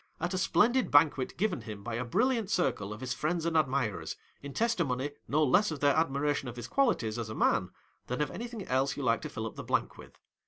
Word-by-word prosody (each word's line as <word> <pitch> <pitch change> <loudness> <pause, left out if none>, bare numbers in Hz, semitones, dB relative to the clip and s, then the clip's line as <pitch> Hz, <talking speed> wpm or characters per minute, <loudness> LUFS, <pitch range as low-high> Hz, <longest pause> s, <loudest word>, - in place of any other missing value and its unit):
at 175 - -2
a - - 0
splendid 215 +8 +3
banquet 145 -3 +3
given 190 - 0
him 105 -3 -8
by 120 - -4
a 120 +2 -1
brilliant 225 - +1
circle 105 - 0
of 105 - -7
his 125 -1 -2
friends 165 +2 -1
and 170 -1 0
admirers, 130 - 0 0.3
in 140 - -7
testimony, 145 - 0 0.2
no 155 +2 +2
less 180 +10 +4
of 155 -3 -4
their 145 0 +4
admi 140 -3 +1
ration 145 -2 0
of 120 - -8
his 120 -1 -6
qualities 120 - +1
as 115 -2 -4
a 110 - -5
man, - - +2 0.4
than 125 - -3
of 150 - 0
any 240 - -5
thing 230 -5 -7
else 130 +2 +1
you 140 - -3
like 115 -2 +2
to 155 - -5
till 115 -6 -5
up 110 - -5
the - - -7
blank - - -1
with. - - -14
145 Hz, 240 wpm, -30 LUFS, 125-175 Hz, 0.4 s, less